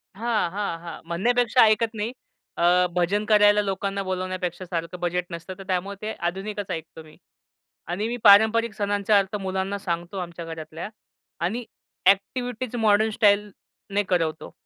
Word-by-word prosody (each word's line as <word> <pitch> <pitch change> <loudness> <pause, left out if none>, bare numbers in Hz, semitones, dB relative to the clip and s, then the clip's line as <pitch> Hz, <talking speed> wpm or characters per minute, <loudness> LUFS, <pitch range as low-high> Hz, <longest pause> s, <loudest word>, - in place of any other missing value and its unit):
हां, 220 -5 0
हां, 195 -4 -3
हां. 170 -2 -8
म्हणण्यापेक्षा 240 +8 +2
ऐकत 220 +1 +2
नाही. 220 +2 -3 0.5
अ, 180 +1 +4
भजन 195 +4 +1
करायला 210 -1 +5
लोकांना 195 0 -2
बोलावण्यापेक्षा 185 -1 -3
सारखं 170 0 -4
बजेट 175 0 -1
नसतं. 170 +2 -6
तर 195 - -9
त्यामुळे 190 +2 -1
ते 215 - -3
आधुनिकच 195 +3 -3
ऐकतो 160 0 -6
मी. 155 - -17 0.7
आणि 195 +6 -2
मी 240 +1 -3
पारंपरिक 220 +2 +6
सणांचा 205 0 +1
अर्थ 200 +1 0
मुलांना 190 +1 -2
सांगतो 175 +1 -4
आमच्या 170 -1 -6
घरातल्या 160 +2 -7 0.6
आणि 230 +6 -2 0.4
अ‍ॅक्टिव्हिटीज 245 +4 +1
मॉडर्न 220 -1 +3
स्टाईलने 205 -1 0
करवतो. 165 -3 -1
195 Hz, 140 wpm, -24 LUFS, 175-215 Hz, 0.7 s, पारंपरिक